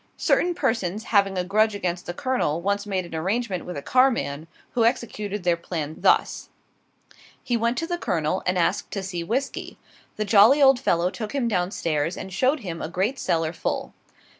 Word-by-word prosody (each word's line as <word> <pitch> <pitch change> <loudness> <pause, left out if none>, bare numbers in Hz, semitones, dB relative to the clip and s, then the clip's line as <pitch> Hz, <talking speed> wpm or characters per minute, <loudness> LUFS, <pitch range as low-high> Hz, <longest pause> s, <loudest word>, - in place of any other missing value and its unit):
Certain 350 0 +2
persons 220 - -1
having 200 -4 +2
a 180 - +1
grudge 215 +3 +2
against 180 -3 -3
the 175 - -3
Colonel, 255 - 0
once 200 +3 -1
made 190 -3 -1
an 170 - -11
arrangement 190 +3 -2
with 180 -4 -6
a 140 - -6
carman, 235 - +1 0.2
who 235 - +1
executed 210 -4 -1
their 175 -1 +3
plan, 160 -3 -5
thus: - - +2 0.9
He 245 - 0
went 235 +1 0
to 330 - -1
the 345 +1 -3
Colonel, 165 - -1
and 180 0 +1
asked 175 +3 0
to 195 - -3
see 180 -3 -4
whisky. 250 +10 -3 0.4
The 215 - -2
jolly 220 +7 +6
old 270 -2 +6
fellow 175 -2 +1
took 215 +4 -6
him 260 -4 +1
down 180 -5 0
stairs 165 -3 -1
and 190 -1 -7
showed 260 +8 +1
him 170 -5 -6
a 155 - -4
great 195 +10 -1
cellar 165 -1 0
full. - - -3
195 Hz, 190 wpm, -24 LUFS, 175-235 Hz, 0.9 s, jolly